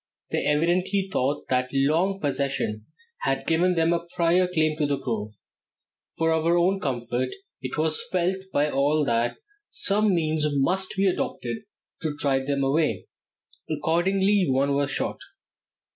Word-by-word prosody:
They - - 0
evidently 180 +6 +1
thought 140 +3 0
that 125 0 +1
long 160 +8 +2
possession 135 - -2 0.3
had 485 - -1
given 175 +3 +2
them 165 0 +3
a 170 0 -2
prior 180 +1 +3
claim 155 -3 +1
to 150 -2 +1
the 140 -1 0
grove. 110 -5 -4 0.8
For 165 0 +2
our 165 +2 +2
own 185 +3 +2
comfort 125 -3 -2 0.3
it 130 +1 -5
was 155 0 0
felt 185 +1 +1
by 145 +1 +1
all 145 +2 +2
that 115 -1 0 0.3
some 210 - +2
means 155 -2 +1
must 180 +8 0
be 195 - +3
adopted 190 +3 -1 0.4
to 150 -2 -3
drive 135 -2 0
them 140 -1 0
away. 150 +3 +1 0.6
Accordingly 185 +5 +2
one 135 +2 +2
was 140 0 +1
shot. - - -2
155 Hz, 145 wpm, -25 LUFS, 140-180 Hz, 0.8 s, them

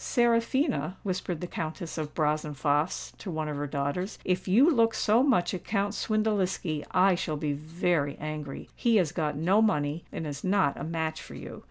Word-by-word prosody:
"Seraphina," 235 - +1
whispered 185 -3 -3
the - - -2
Countess 165 0 -5
of 155 -2 -5
Brazenphace 150 0 0
to 200 - -6
one 155 -2 -2
of 150 - -3
her 145 +1 -3
daughters, 145 +8 -2
"if 185 +1 0
you 230 - +6
look 230 -8 +4
so 220 +3 +3
much 235 -11 +2
at 180 - -4
Count 200 -1 0
Swindeliski, 200 -8 0
I 185 +1 +4
shall 155 -3 -2
be 145 -1 -1
very 155 0 -1
angry. 150 -2 -5
He 235 -2 +2
has 180 -8 +3
got 150 -4 -1
no 185 +7 +3
money, 150 -6 +1
and 160 - -4
is 145 -1 -5
not 190 -7 +2
a - - -6
match 160 -1 -2
for - - -10
you. - - -8
170 Hz, 185 wpm, -28 LUFS, 150-205 Hz, -, you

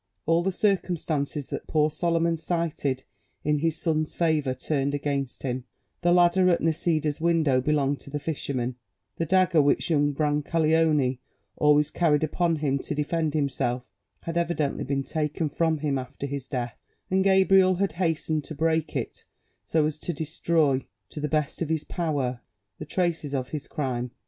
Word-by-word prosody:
All 165 +2 +3
the 190 +2 0
circumstances 165 -8 -1
that - - -5
poor 155 -1 +2
Solomon 165 +1 +1
cited 160 -5 -2 0.4
in 150 0 +1
his 165 +1 0
son's 155 -2 -1
favour 155 -6 +1
turned 140 +1 -1
against 140 -2 -3
him: 125 -1 -3 0.4
the 175 0 +3
ladder 180 +1 +5
at 170 - +3
Nisida's 155 -2 0
window 160 -6 +3
belonged 145 0 +1
to - - -12
the 150 - -3
fisherman; 130 -5 -3 0.4
the 165 - -1
dagger 185 -2 +4
which 145 +4 +2
young 145 -2 +3
Brancaleone 150 -2 +2 0.4
always 150 0 +3
carried 155 -3 +2
upon 165 +2 +1
him 140 -3 0
to 150 - -4
defend 155 +1 -1
himself 125 -5 -1 0.3
had 165 0 -4
evidently 170 -4 0
been 135 0 -1
taken 155 +1 -2
from 160 +1 +1
him 145 -2 -1
after 130 +2 -6
his 140 -2 -4
death, 120 -4 -4 0.3
and 190 0 +3
Gabriel 190 -1 +5
had 195 0 0
hastened 160 -2 0
to 155 - -7
break 160 +1 0
it, - - -4 0.4
so 160 -2 +1
as 155 0 -2
to 175 - -3
destroy, 155 -2 +1 0.3
to - - -7
the 150 0 -2
best 155 +1 -1
of 165 - -1
his 160 -2 0
power, 145 -8 -2 0.4
the 150 - -5
traces 165 -3 -1
of 130 -2 -2
his 150 -2 -5
crime. 125 -4 -2
155 Hz, 165 wpm, -26 LUFS, 140-165 Hz, 0.4 s, ladder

